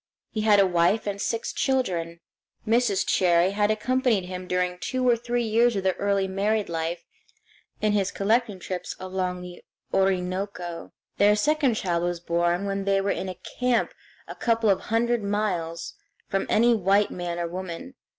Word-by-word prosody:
He 215 - -2
had 210 -1 +5
a 195 - +6
wife 180 +4 +2
and 200 -1 -3
six 230 - -2
children. 175 -11 -1 0.5
Mrs. 230 -3 +2
Cherrie 175 0 +3
had 205 +1 +1
accompanied 230 -2 +1
him 180 0 -6
during 180 -1 -1
two 255 +4 -1
or 240 - +5
three 240 +1 -2
years 230 +1 +3
of 195 - -1
their 190 -1 +2
early 200 -1 +1
married 205 +2 0
life 165 +1 -3 0.8
in 215 - +2
his 200 -2 +1
collecting 215 0 0
trips 180 0 -5
along 185 -1 -3
the 180 -1 -10 0.3
Orinoco. 185 -2 -1 0.3
Their 205 +1 +5
second 285 +2 +2
child 175 -5 -1
was 175 0 -1
born 175 +2 0
when 195 0 -2
they 195 0 +2
were 195 +1 0
in 185 0 -3 0.3
camp 250 -2 +1 0.3
a - - -6
couple 230 -3 +2
of 190 - +1
hundred 235 +1 +1
miles 180 -5 -2 0.3
from 195 - -1
any 235 +2 +4
white 200 -1 +2
man 175 -1 -4
or 170 -1 -2
woman. 185 +8 -6
195 Hz, 165 wpm, -25 LUFS, 180-220 Hz, 0.8 s, a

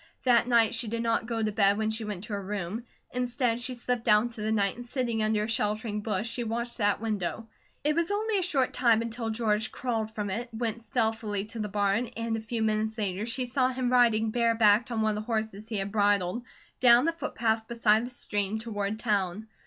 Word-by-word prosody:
That 240 -2 +4
night 230 -3 +4
she 225 0 +1
did 230 +2 -2
not 230 0 0
go 230 -2 -1
to 215 - 0
bed 200 -1 +3
when 220 0 0
she 220 0 -2
went 205 -3 -5
to 215 - -5
her 200 - -2
room. 205 +3 -4 0.3
Instead 245 -1 0
she 250 +1 -2
slipped 240 -1 -3
out 210 0 +6
into 235 -2 -5
the 215 +1 -1
night 200 -3 +1
and 245 - -8
sitting 240 -2 -2
under 215 -1 +1
a - - -2
sheltering 210 -1 -1
bush 210 0 -1
she 235 +1 -3
watched 235 +2 -4
that 205 -1 +2
window. 220 0 -3 0.4
It 300 +1 +2
was 335 +2 0
only 420 0 0
a - - 0
short 280 -8 +1
time 230 -3 +3
until 230 0 -3
George 220 -1 0
crawled 225 -4 -2
from 210 -2 -4
it, 235 +5 -3
went 230 0 -3
stealthily 220 -4 -1
to 225 +1 -8
the 210 -1 -2
barn, 205 +3 +1
and 230 0 -1
a - - -2
few 225 0 -2
minutes 220 +1 0
later 205 0 -2
she 250 +2 -1
saw 255 +1 +1
him 255 -1 -1
riding 225 -3 +4
barebacked 230 -1 +3
on 225 -2 -1
one 215 - +2
of 210 - -3
the - - -19
horses 220 -1 -2
he 220 - -3
had 195 0 -2
bridled, 205 +1 +1 0.3
down 245 +1 +6
the 330 - +1
footpath 220 -8 -1
beside 225 -1 +3
the 245 - -5
stream 210 -4 -2
toward 215 -2 -3
town. 205 -2 -1
225 Hz, 225 wpm, -28 LUFS, 210-240 Hz, 0.4 s, out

